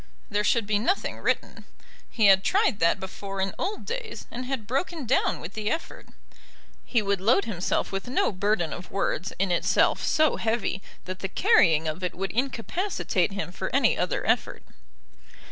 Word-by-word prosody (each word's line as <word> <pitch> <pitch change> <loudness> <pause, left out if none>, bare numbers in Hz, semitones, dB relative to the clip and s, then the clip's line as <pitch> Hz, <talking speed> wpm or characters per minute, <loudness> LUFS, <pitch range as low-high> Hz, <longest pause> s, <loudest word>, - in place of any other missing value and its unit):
There 205 0 +1
should 230 +1 +2
be 205 0 +1
nothing 370 - -1
written; - - -2 0.4
he 220 - +1
had 195 -1 +6
tried 385 - +2
that 165 0 +3
before 195 +1 -6
in 190 0 0
old 410 +2 -3
days, 475 -1 -5
and 250 +1 -5
had 260 -5 -3
broken 275 - -2
down 250 - +1
with 165 - -8
the 215 -1 -2
effort. 325 - -4 0.8
He 235 -4 +1
would 200 -2 0
load 205 0 +3
himself 190 -6 -1
with 195 +2 -4
no 250 - +1
burden 195 -4 0
of 175 - -8
words 190 -2 -1
in 195 -1 0
itself 175 - +2
so 310 -1 +3
heavy 220 -3 -1 0.2
that 185 +1 -6
the 195 - -3
carrying 160 -4 +4
of 155 +4 -4
it 180 - -2
would 195 +2 -3
incapacitate 245 - -1
him 200 -3 -4
for - - -4
any - - +4
other - - -1
effort. - - 0
205 Hz, 175 wpm, -26 LUFS, 190-250 Hz, 0.8 s, had